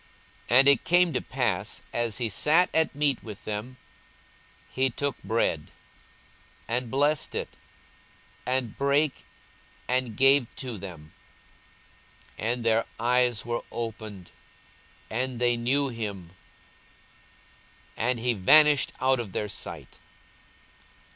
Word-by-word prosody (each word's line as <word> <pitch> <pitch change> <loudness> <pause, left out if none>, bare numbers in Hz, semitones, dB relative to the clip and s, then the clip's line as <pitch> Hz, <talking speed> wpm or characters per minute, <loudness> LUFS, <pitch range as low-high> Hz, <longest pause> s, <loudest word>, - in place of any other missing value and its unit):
42:024:030 120 - +5
And 135 - +6
it 140 -4 +5
came 175 -1 +3
to 125 - 0
pass, - - -2
as 115 -4 -1
he 120 - -1
sat 155 - +2
at 160 -3 +2
meat 145 -3 +1
with 105 -3 -10
them, 110 +5 -5 0.9
he 130 0 +1
took 140 +3 -3
bread, 85 -9 -1 1.0
and 120 +1 -1
blessed 145 +4 +1
it, - - -4 0.9
and 125 -3 -1
brake, 140 +1 +1 0.6
and 125 -3 0
gave 135 -1 +5
to 125 -6 -6
them. 85 -5 -10 1.3
42:024:031 115 - 0
And 125 -1 -6
their 115 0 +2
eyes 120 -1 +2
were 120 0 -2
opened, 110 -5 -6 0.8
and 125 +2 -2
they 120 -1 +3
knew 135 +4 +1
him; 100 -7 -6 1.6
and 125 +2 0
he 120 +1 0
vanished 145 +8 +5
out 130 0 +2
of 110 -5 -5
their 105 - -2
sight. 100 - -7
120 Hz, 120 wpm, -27 LUFS, 110-135 Hz, 1.6 s, And